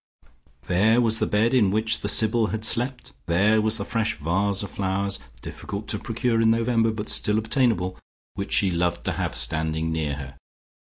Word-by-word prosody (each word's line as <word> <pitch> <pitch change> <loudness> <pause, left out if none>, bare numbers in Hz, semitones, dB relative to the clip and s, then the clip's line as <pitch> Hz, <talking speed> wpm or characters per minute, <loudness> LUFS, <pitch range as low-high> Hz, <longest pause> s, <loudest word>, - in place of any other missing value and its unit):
There 105 +6 +3
was 115 -2 +2
the - - 0
bed 110 +4 +1
in 115 -7 +4
which 110 +2 +1
the - - -3
Sybil 110 0 +3
had 110 0 -4
slept; 125 +2 -3
there 105 +6 +3
was 110 +1 +2
the 100 - -4
fresh 115 -1 -1
vase 95 +6 0
of 100 - -7
flowers, 100 0 -1 0.2
difficult 100 +2 -7
to 105 - +1
procure 115 0 -1
in 110 - +4
November, 115 0 +2
but 110 -1 -5
still 105 0 +1
obtainable, 110 -5 0 0.3
which 100 0 -6
she 95 -2 +2
loved 85 0 -1
to - - 0
have - - -3
standing 80 +1 0
near 80 -3 -2
her. 70 -1 -9
105 Hz, 180 wpm, -24 LUFS, 95-115 Hz, 0.3 s, in